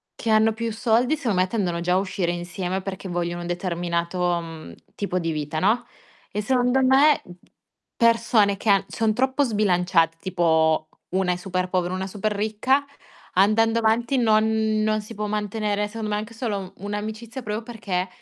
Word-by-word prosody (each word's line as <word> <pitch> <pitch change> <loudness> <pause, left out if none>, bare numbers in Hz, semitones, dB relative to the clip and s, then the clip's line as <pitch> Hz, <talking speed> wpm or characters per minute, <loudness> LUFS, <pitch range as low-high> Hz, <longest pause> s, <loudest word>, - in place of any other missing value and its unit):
che 230 - -4
hanno 220 +1 +5
più 230 0 -3
soldi, 240 +6 +2
secondo 225 -11 -1
me, 185 - +3
tendono 180 -5 -1
già 180 +1 0
a - - +4
uscire 185 -2 -1
insieme 180 +2 -3
perché 190 0 -6
vogliono 175 0 -2
un 175 - -5
determinato, 175 0 -1
mhmm, 160 - -9 0.2
tipo 185 -3 -2
di 165 -1 -2
vita, 150 0 -3
no, 215 +7 +2 0.5
e 210 - -2
secondo 250 +3 +2
me, 275 +3 +5 0.7
persone 230 -3 +3
che 215 - -2
han 195 -1 +4
son 220 -1 0
troppo 265 +4 +1
sbilanciate, 180 -7 +2
tipo 160 -3 +1 0.2
una 185 0 +1
è - - -3
super 185 0 -2
povera, 180 -1 0
una 190 +1 -3
super 210 +2 -2
ricca, 220 +7 +1 0.5
andando 225 +4 +3
avanti 235 +4 +1
non 215 -2 +4 0.4
non 215 0 +1
si 215 +2 -10
può 210 0 -3
mantenere, 210 0 -1
secondo 215 0 -5
me, 210 - 0
anche 215 +2 -5
solo 205 -6 -4
un'amicizia 215 +5 -5
proprio 210 +2 -3
perché, 200 -6 -3
205 Hz, 170 wpm, -24 LUFS, 180-225 Hz, 0.7 s, hanno